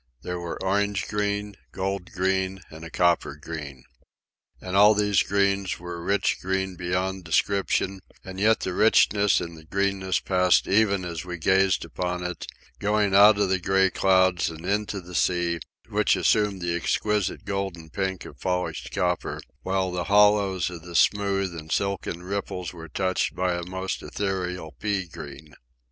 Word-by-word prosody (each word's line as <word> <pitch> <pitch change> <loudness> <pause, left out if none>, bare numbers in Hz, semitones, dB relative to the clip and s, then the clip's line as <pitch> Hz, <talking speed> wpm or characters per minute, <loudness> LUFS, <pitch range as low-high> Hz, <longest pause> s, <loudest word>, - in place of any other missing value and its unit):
There 90 0 -4
were 85 -1 -5
orange 100 +1 0
green, 105 -1 -2 0.2
gold 95 +2 -3
green, 95 -1 -1
and 80 +1 -10
a 80 - -7
copper 85 -4 +1
green. 75 -4 -8 0.8
And 90 +1 -5
all 105 +2 +7
these 105 -2 +3
greens 100 -1 0
were 85 0 -7
rich 100 +4 0
green 95 0 -1
beyond 90 +1 -2
description; 95 +3 0 0.3
and 95 0 -7
yet 110 +2 +3
the 95 - -2
richness 105 -1 +4
and 85 -1 -6
the 80 - -13
greenness 95 +1 0
passed 90 -1 +2
even 100 -2 +2
as 85 -3 -5
we 90 -1 -6
gazed 95 +2 +2
upon 90 0 -3
it, 90 0 -5 0.3
going 105 -1 +1
out 100 +1 +8
of 100 -2 +1
the 95 0 +1
gray 95 +1 +2
clouds 95 -2 +3
and 80 +1 -9
into 100 0 -1
the 90 0 -12
sea, 85 -1 +1 0.3
which - - +2
assumed 105 -4 +1
the 85 0 0
exquisite 105 +3 -1
golden 95 -5 -4
pink 95 -3 -3
of - - -12
polished 90 -1 -2
copper, 90 -3 -1 0.2
while 95 -1 -1
the 90 -1 -3
hollows 100 -3 +3
of 85 -2 -8
the 85 +1 -10
smooth 100 -3 +2
and 80 -1 -9
silken 95 -2 -2
ripples 90 -2 -4
were 80 -2 -10
touched 95 +3 -1
by 90 -1 0
a 85 - -3
most 95 +1 -3
ethereal 90 -4 -3
pea 100 -3 -1
green. 75 -2 -11
95 Hz, 160 wpm, -25 LUFS, 90-100 Hz, 0.8 s, out